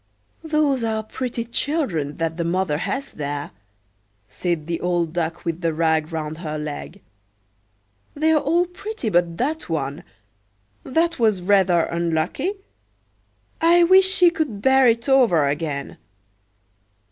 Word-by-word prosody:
"Those 305 Hz, -5 st, +1 dB
are 220 Hz, -1 st, -1 dB
pretty 235 Hz, +1 st, -4 dB
children 230 Hz, -, -2 dB
that 165 Hz, -1 st, -2 dB
the 170 Hz, -, -1 dB
mother 170 Hz, -3 st, 0 dB
has 275 Hz, +9 st, -3 dB
there," 145 Hz, -1 st, -5 dB, 0.8 s
said 170 Hz, +3 st, -3 dB
the 170 Hz, 0 st, -3 dB
old 175 Hz, -2 st, 0 dB
Duck 170 Hz, -1 st, -3 dB
with 170 Hz, +1 st, -3 dB
the 165 Hz, -2 st, -1 dB
rag 160 Hz, 0 st, +1 dB
round 155 Hz, -1 st, -4 dB
her 155 Hz, -3 st, -4 dB
leg. 150 Hz, +5 st, -7 dB, 1.1 s
"They're 310 Hz, +1 st, +3 dB
all 335 Hz, +5 st, +1 dB
pretty 360 Hz, -, -5 dB
but 175 Hz, -3 st, +1 dB
that 300 Hz, -, -2 dB
one; 145 Hz, -3 st, -3 dB, 0.8 s
that 330 Hz, +3 st, 0 dB
was 215 Hz, -6 st, +2 dB
rather 190 Hz, -3 st, +3 dB
unlucky. 170 Hz, -, -1 dB, 1.1 s
I 340 Hz, +1 st, +5 dB
wish 375 Hz, +2 st, +6 dB
she 365 Hz, -2 st, +5 dB
could 300 Hz, -11 st, -3 dB
bear 265 Hz, -1 st, +5 dB
it 230 Hz, +1 st, +1 dB
over 235 Hz, -, +4 dB
again." 145 Hz, -1 st, -3 dB
185 Hz, 130 wpm, -22 LUFS, -, 1.1 s, wish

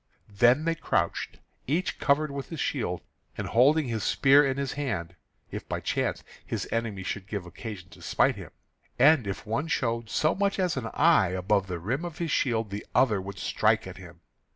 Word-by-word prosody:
Then 120 Hz, +9 st, +4 dB
they 165 Hz, -, +2 dB
crouched, 165 Hz, -, -1 dB, 0.3 s
each 165 Hz, +7 st, -1 dB
covered 150 Hz, +1 st, +2 dB
with 140 Hz, -1 st, -6 dB
his 165 Hz, -, -6 dB
shield, 110 Hz, -14 st, -2 dB, 0.4 s
and -, -, -3 dB
holding 140 Hz, +5 st, +4 dB
his 115 Hz, -3 st, -2 dB
spear 140 Hz, +1 st, +5 dB
in 135 Hz, -1 st, 0 dB
his 140 Hz, -1 st, -2 dB
hand, 95 Hz, -, -3 dB, 0.4 s
if -, -, -7 dB
by -, -, -2 dB
chance -, -, -1 dB, 0.2 s
his -, -, -4 dB
enemy 110 Hz, -4 st, -2 dB
should 95 Hz, 0 st, -4 dB
give 100 Hz, -4 st, -4 dB
occasion 90 Hz, 0 st, -8 dB
to -, -, -15 dB
smite -, -, +2 dB
him; -, -, -9 dB, 0.5 s
and 140 Hz, -3 st, +5 dB
if 95 Hz, -, -5 dB
one 135 Hz, +9 st, -1 dB
showed 115 Hz, -6 st, -1 dB
so 155 Hz, +8 st, +2 dB
much 200 Hz, 0 st, 0 dB
as 180 Hz, -4 st, +1 dB
an 125 Hz, -4 st, -3 dB
eye 160 Hz, -, +5 dB
above 95 Hz, +2 st, 0 dB
the 90 Hz, -2 st, -3 dB
rim 120 Hz, -, -2 dB
of 170 Hz, -3 st, -6 dB
his 170 Hz, -3 st, -2 dB
shield 115 Hz, -7 st, 0 dB
the 100 Hz, +1 st, -4 dB
other 110 Hz, -7 st, +3 dB
would 100 Hz, +1 st, -8 dB
strike 110 Hz, +3 st, +1 dB
at 95 Hz, -1 st, -9 dB
him. 85 Hz, -2 st, -13 dB
115 Hz, 195 wpm, -27 LUFS, 100-145 Hz, 0.5 s, spear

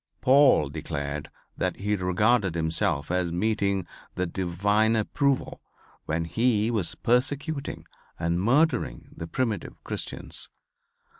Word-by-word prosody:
Paul 130 Hz, -, +5 dB
declared 75 Hz, -1 st, -4 dB, 0.3 s
that -, -, -1 dB
he 105 Hz, +1 st, -1 dB
regarded 95 Hz, +1 st, +2 dB
himself 80 Hz, -2 st, 0 dB
as 90 Hz, -2 st, 0 dB
meeting 100 Hz, 0 st, 0 dB, 0.3 s
the 90 Hz, -, 0 dB
divine 100 Hz, +5 st, +1 dB
approval 135 Hz, +5 st, 0 dB, 0.5 s
when 80 Hz, +1 st, -1 dB
he 110 Hz, +3 st, +1 dB
was 100 Hz, -8 st, 0 dB
persecuting 140 Hz, +5 st, -1 dB, 0.3 s
and 85 Hz, +1 st, 0 dB
murdering 145 Hz, +10 st, +1 dB
the 80 Hz, -, -6 dB
primitive 115 Hz, -3 st, -3 dB
Christians. -, -, -5 dB
100 Hz, 105 wpm, -26 LUFS, 85-120 Hz, 0.5 s, Paul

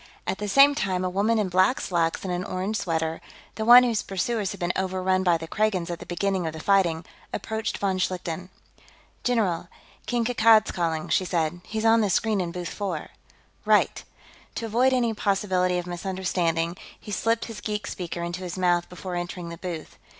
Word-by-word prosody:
At -, -, -2 dB
the 210 Hz, -, -3 dB
same 275 Hz, +7 st, +6 dB
time, 185 Hz, -9 st, -1 dB
a 180 Hz, -, -1 dB
woman 210 Hz, +5 st, +2 dB
in 210 Hz, -3 st, +1 dB
black 185 Hz, +7 st, +3 dB
slacks 165 Hz, -2 st, 0 dB
and 185 Hz, -2 st, -2 dB
an 175 Hz, +1 st, -2 dB
orange 190 Hz, +3 st, -2 dB
sweater 160 Hz, -3 st, -2 dB, 0.3 s
the 220 Hz, -, -4 dB
one 245 Hz, +2 st, +10 dB
whose 235 Hz, -4 st, +1 dB
pursuers 200 Hz, +2 st, -2 dB
had -, -, -7 dB
been 175 Hz, 0 st, -1 dB
overrun 185 Hz, 0 st, 0 dB
by 175 Hz, -3 st, +3 dB
the 165 Hz, 0 st, -8 dB
Kragans 190 Hz, -4 st, 0 dB
at 170 Hz, -, -5 dB
the -, -, -10 dB
beginning 185 Hz, 0 st, -1 dB
of 160 Hz, -, -4 dB
the 160 Hz, -, -7 dB
fighting 175 Hz, -3 st, +2 dB, 0.3 s
approached 220 Hz, 0 st, -3 dB
von 190 Hz, -2 st, -1 dB
Schlichten. 180 Hz, -1 st, -3 dB, 0.7 s
"General, 200 Hz, -9 st, 0 dB, 0.4 s
King 240 Hz, -2 st, 0 dB
Kankad's 225 Hz, -2 st, +5 dB
calling," 165 Hz, -3 st, -1 dB
she -, -, +2 dB
said. 175 Hz, -1 st, -1 dB
"He's 220 Hz, +1 st, -3 dB
on 225 Hz, 0 st, +5 dB
the 210 Hz, -, +1 dB
screen 210 Hz, +1 st, +1 dB
in 175 Hz, -1 st, -3 dB
booth 175 Hz, -1 st, -5 dB
four." 185 Hz, -7 st, -4 dB, 0.5 s
"Right." -, -, +2 dB, 0.5 s
To 230 Hz, -, -3 dB
avoid 240 Hz, +4 st, +3 dB
any 240 Hz, -3 st, +1 dB
possibility 190 Hz, -3 st, +1 dB
of 175 Hz, -, -3 dB
misunderstanding, 175 Hz, -2 st, -1 dB, 0.2 s
he 210 Hz, -, -10 dB
slipped 225 Hz, +4 st, 0 dB
his 225 Hz, -2 st, -8 dB
geek 210 Hz, -1 st, -3 dB
speaker 175 Hz, -1 st, -5 dB
into 175 Hz, +1 st, -4 dB
his 180 Hz, 0 st, -5 dB
mouth 175 Hz, -1 st, +1 dB
before 180 Hz, +1 st, -7 dB
entering 175 Hz, 0 st, -4 dB
the 170 Hz, -, -7 dB
booth. 170 Hz, -4 st, -7 dB
185 Hz, 190 wpm, -25 LUFS, 175-215 Hz, 0.7 s, one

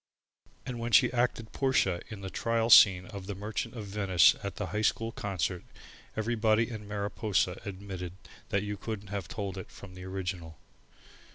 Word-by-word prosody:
And 125 Hz, -2 st, -5 dB
when 120 Hz, +1 st, -3 dB
she 125 Hz, +1 st, +6 dB
acted 120 Hz, -2 st, 0 dB
Portia 130 Hz, -10 st, +1 dB
in 105 Hz, -3 st, -8 dB
the 95 Hz, -1 st, -6 dB
Trial 115 Hz, 0 st, 0 dB
Scene 95 Hz, -4 st, +8 dB
of 100 Hz, -2 st, -8 dB
the 100 Hz, -, -4 dB
Merchant 110 Hz, +4 st, -4 dB
of 110 Hz, -3 st, -5 dB
Venice 95 Hz, -4 st, +4 dB
at -, -, -5 dB
the -, -, -3 dB
High 105 Hz, -, 0 dB
School 115 Hz, +1 st, +1 dB
concert, 95 Hz, -6 st, -2 dB, 0.5 s
everybody 110 Hz, +1 st, +2 dB
in 105 Hz, -2 st, -7 dB
Mariposa 100 Hz, -2 st, -1 dB
admitted 95 Hz, -3 st, -6 dB, 0.4 s
that 100 Hz, 0 st, +1 dB
you 105 Hz, 0 st, -4 dB
couldn't 105 Hz, -2 st, -6 dB
have 100 Hz, -4 st, -4 dB
told 95 Hz, 0 st, -4 dB
it -, -, -9 dB
from 100 Hz, -2 st, -12 dB
the 90 Hz, 0 st, -9 dB
original. 90 Hz, -4 st, -5 dB
100 Hz, 170 wpm, -30 LUFS, 95-110 Hz, 0.5 s, Scene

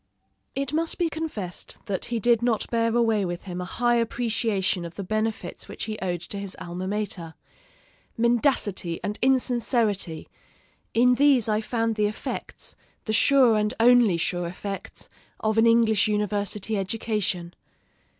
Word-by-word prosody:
It 275 Hz, +1 st, -2 dB
must 325 Hz, +1 st, 0 dB
be 345 Hz, -2 st, +1 dB
confessed 300 Hz, -, -5 dB
that 200 Hz, -4 st, -3 dB
he 235 Hz, -1 st, -2 dB
did 235 Hz, +1 st, +3 dB
not 235 Hz, -3 st, +1 dB
bear 230 Hz, -1 st, +1 dB
away 225 Hz, -3 st, +2 dB
with 175 Hz, -1 st, -4 dB
him 180 Hz, -2 st, -5 dB
a -, -, -4 dB
high 240 Hz, +5 st, +1 dB
appreciation 225 Hz, -5 st, 0 dB
of 170 Hz, 0 st, -8 dB
the 200 Hz, -, -5 dB
benefits 215 Hz, +3 st, -3 dB
which -, -, -6 dB
he 215 Hz, -1 st, -4 dB
owed 175 Hz, -3 st, -2 dB
to 200 Hz, +3 st, -7 dB
his 200 Hz, -2 st, -3 dB
alma 180 Hz, +2 st, -5 dB
mater. 195 Hz, -5 st, -3 dB, 0.8 s
"Mendacity 230 Hz, -, +1 dB
and 210 Hz, +1 st, -3 dB
insincerity 235 Hz, -, +1 dB, 0.7 s
in 250 Hz, +2 st, +5 dB
these 270 Hz, -3 st, +4 dB
I 215 Hz, 0 st, +1 dB
found 225 Hz, -1 st, -1 dB
the 210 Hz, -1 st, +3 dB
effects, 210 Hz, -, -5 dB, 0.3 s
the 220 Hz, -, -1 dB
sure 255 Hz, 0 st, +5 dB
and 210 Hz, +3 st, 0 dB
only 235 Hz, -5 st, +5 dB
sure 175 Hz, +1 st, -1 dB
effects, 195 Hz, +3 st, -6 dB, 0.3 s
of 220 Hz, 0 st, +1 dB
an 230 Hz, -, +5 dB
English 230 Hz, -2 st, +4 dB
university 210 Hz, 0 st, -1 dB
education." 195 Hz, -4 st, -2 dB
215 Hz, 150 wpm, -25 LUFS, 195-235 Hz, 0.8 s, in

